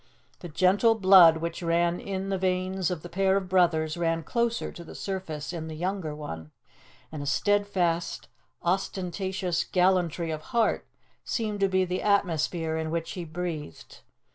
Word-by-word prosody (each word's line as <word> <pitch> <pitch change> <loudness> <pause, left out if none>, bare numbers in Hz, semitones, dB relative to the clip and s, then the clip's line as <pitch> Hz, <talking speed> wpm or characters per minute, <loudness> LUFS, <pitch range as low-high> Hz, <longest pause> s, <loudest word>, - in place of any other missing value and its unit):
The 175 - -8
gentle 195 +8 +3
blood 185 -5 +7
which 170 +2 -4
ran 170 +1 +1
in 195 0 -4
the 195 - 0
veins 185 -1 0
of 175 -4 -4
the - - -6
pair 190 +2 +2
of 190 -2 -3
brothers 170 -3 +2
ran 165 -1 0
closer 235 +6 -1
to 170 - -10
the 165 - -11
surface 175 -6 -5
in 160 -2 -5
the 160 - -6
younger 175 -2 -3
one; 80 - -7 0.6
and 155 -2 -6
a 145 - -5
steadfast, 185 -1 0 0.4
unostentatious 185 0 -1
gallantry 180 -3 +1
of 155 -1 -4 0.2
heart 230 - +2 0.4
seemed 215 -3 -2
to 195 - +3
be 185 0 +2
the 180 +1 -2
atmosphere 165 -5 +1
in 160 0 -2
which 165 0 -3
he 180 -3 -5
breathed. 160 - -6
180 Hz, 160 wpm, -27 LUFS, 165-190 Hz, 0.6 s, blood